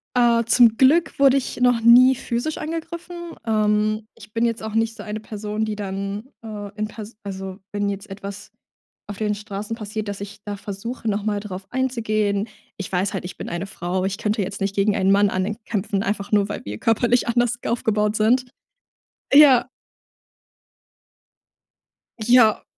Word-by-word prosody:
Äh. 240 -1 +4
Zum 235 -1 +5
Glück 310 +7 +4
wurde 275 -1 +6
ich 265 - -3
noch 245 -2 +4
nie 250 +3 +7
physisch 245 +4 -3
angegriffen. 330 +2 -5 0.3
Ähm. 215 0 +1
Ich 215 - -15
bin 230 +1 +1
jetzt 230 -1 -2
auch 220 -1 -5
nicht 225 0 +1
so 210 - -9
eine 210 0 -5
Person, 215 0 -4
die 215 -1 -3
dann, 200 +1 -4 0.2
ähm, 205 -2 -7
in 215 0 -2
pers 215 +1 -10
also, 190 -1 -6
wenn 205 0 -1
jetzt 200 0 -6
etwas 200 +1 -8 0.6
auf 205 - -6
den 210 -1 0
Straßen 205 +1 -5
passiert, 215 -1 -5
dass 200 - -5
ich 205 +1 -8
da 205 -1 -4
versuche, 220 +5 -6
noch 205 0 -1
mal 210 -1 0
drauf 195 -2 -7
einzugehen. 215 -5 0 0.3
Ich 195 - -6
weiß 185 +1 0
halt, - - -3
ich 180 - -8
bin - - -6
eine 170 +2 -3
Frau. 185 0 -3
Ich 195 +1 -2
könnte 215 0 -1
jetzt 195 +1 -4
nicht 195 0 -1
gegen 200 +1 +2
einen 190 -1 +3
Mann 200 +1 +4
ankämpfen, 200 +1 -2
einfach 200 0 -3
nur, 205 -1 +3
weil 205 - -5
wir 105 +1 -5
körperlich 235 - +2
anders 240 0 +2
aufgebaut 215 -2 0
sind. 245 +4 +3 0.9
Ja. 280 -4 +7 2.6
Ja, 230 -2 +5
215 Hz, 170 wpm, -22 LUFS, 200-235 Hz, 2.6 s, nie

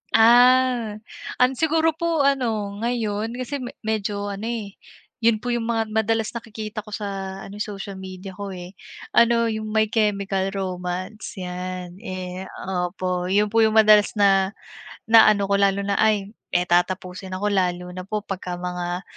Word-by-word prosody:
Ah. 245 -1 +5 0.5
An 250 +1 +5
siguro 320 0 +3
po 330 -3 +1
ano, 225 -7 0
ngayon 225 -1 -2
kasi 255 +3 -4
me 250 -2 -7
medyo 205 -2 -2
ano, 200 +3 -5
eh, 225 -4 -4 0.5
'yun 225 -2 +2
po 245 - -1
'yung 235 -1 -1
mga 225 -1 +1
madalas 220 0 0
nakikita 220 -2 -6
ko 210 - -6
sa 195 -2 -5
ano, 200 +1 -9
social 200 -2 -5
media 190 0 -8
ko, 200 +2 -7
eh, 180 0 -8 0.4
ano 235 -1 +4
'yung 215 0 -4
My 220 0 +1
Chemical 200 -3 +1
Romance 185 +3 -4
'yan. 180 0 -6
Eh, 185 -3 -6 0.4
opo 180 0 -3
'yun 205 +2 +2
po 225 - +3
'yung 220 -1 +4
madalas 215 -1 +6
na 195 -1 +3 0.5
na 225 0 +7
ano 205 -2 +3
ko 200 0 +1
lalo 200 0 +2
na 200 0 0
ay 210 -2 +2 0.2
eh, 175 - +3
tatapusin 185 +1 0
ako 205 +2 -1
lalo 180 -2 0
na 185 +1 -7
po 210 +1 -3
pagka 185 -3 -5
mga 180 0 -4
205 Hz, 160 wpm, -23 LUFS, 190-225 Hz, 0.5 s, na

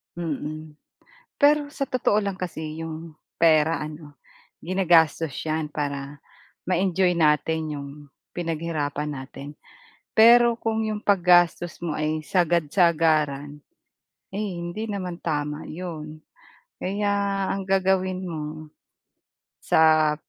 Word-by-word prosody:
Mm. 155 -2 -5 0.6
Pero 295 0 +5
sa 275 -3 -3
totoo 215 -4 +1
lang 200 -2 -3
kasi 160 -3 -5
'yong 160 0 -8 0.2
pera 160 0 +4
ano, 150 -1 -9 0.5
ginagastos 165 -4 +3
'yan 155 -1 -2
para, 140 -1 -4 0.5
ma-enjoy 185 -1 +2
natin 160 0 +2
'yong 140 -1 -7 0.5
pinaghirapan 155 -3 -2
natin. 135 0 -8 0.7
Pero 235 +1 +7
kung 225 0 -1
'yong 215 -1 -3
paggastos 175 -3 +3
mo 160 - -2
ay 155 0 -2
sagad-sagaran, 155 -4 +1 0.7
ay 205 +2 -3 0.2
hindi 175 +6 -5
naman 185 -4 -4
tama 150 -1 -3
'yon, 155 -3 -7 0.6
kaya 205 +2 -1 0.4
ang 195 -1 -2
gagawin 190 -1 +1
mo, 155 -2 -6 0.9
sa 155 -1 +4
165 Hz, 100 wpm, -24 LUFS, 155-185 Hz, 0.9 s, Pero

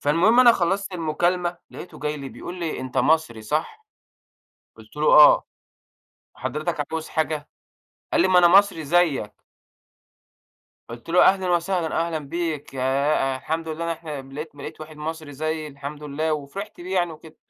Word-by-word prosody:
فالمهم 170 +12 +4
أنا 240 -2 +8
خلّصت 195 0 -1
المكالمة 175 +1 -1
لقيته 180 - -10
جاي 150 0 -3
لي 140 -2 -7
بيقول 175 - -8
لي: 165 -2 -3
"أنت 130 -1 -3
مصري 155 -8 +1
صح؟" 160 - -3 0.9
قُلت - - -17
له: - - -1
"آه، - - +8 0.9
حضرتك 155 -1 -3
عاوز 160 -1 -3
حاجة؟" 155 -2 -2 0.6
قال - - +3
لي: 190 - +2
"ما 185 - +5
أنا 175 -1 +7
مصري 195 -3 +4
زيّك." 150 -9 0 1.4
قُلت 120 +4 -10
له: 175 +2 +5
"أهلًا 190 -1 +3
وسهلًا، 175 -1 0
أهلًا 165 -2 -2
بيك 155 -1 -4
ياه 135 +1 +1
أ - - -3
الحمد 160 +5 -4
لله 160 +1 -4
إن - - -3
إحنا 155 -4 -5
لقيت 155 +2 -7
لقيت 150 +2 -9
واحد 155 0 -10
مصري 155 -1 -6
زيّي 155 +2 -3
الحمد 145 +1 -8
لله." 150 +2 -2
وفرحت 155 +8 -7
بيه 185 +2 -5
يعني 175 -2 +1
وكده. 155 0 -14
160 Hz, 160 wpm, -23 LUFS, 150-175 Hz, 1.4 s, أنا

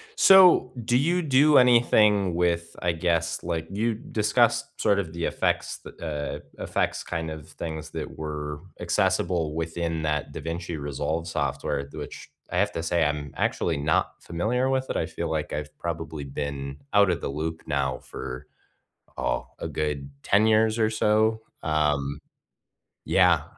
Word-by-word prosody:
So, 180 - +7
do 120 - +3
you 170 +7 +2
do 145 0 +5
anything 105 -6 +5
with, 85 -1 0
I 90 - +2
guess, 85 0 0
like, 85 -1 -2
you 110 +3 0
discussed 105 -1 +1
sort 100 0 +3
of 85 -5 -3
the 85 0 -2
effects - - -1
the, 75 -3 -5 0.2
uh, - - -4
effects - - -1
kind 80 -2 -3
of 80 -2 -9
things 80 -1 -6
that - - -6
were 75 -1 -5 0.2
accessible 80 -4 +1
within 80 -1 -2
that 75 -1 -1
DaVinci 85 0 -4
Resolve 75 +4 -2
software, 70 -2 -2
which - - -8 0.2
I - - -1
have - - +2
to 80 - -3
say 85 0 +2
I'm 75 -2 -2
actually 80 -3 0
not 75 +2 0
familiar 115 +10 0
with 130 0 0
it, - - -1
I 80 - 0
feel 85 +1 -4
like 80 -2 -2
I've 75 0 -5
probably 80 -3 -4
been 70 0 -4 0.2
out 100 -2 +6
of 85 - 0
the - - -3
loop 80 +3 -4
now 70 -3 0
for, 65 -1 -7 0.7
oh, - - -1
a - - -3
good 75 -2 -2
10 105 +2 +4
years 110 +1 +3
or 110 -1 +3
so, 110 0 +2 0.2
um, 75 -3 0 0.9
yeah. - - +4
80 Hz, 155 wpm, -26 LUFS, 75-105 Hz, 0.9 s, So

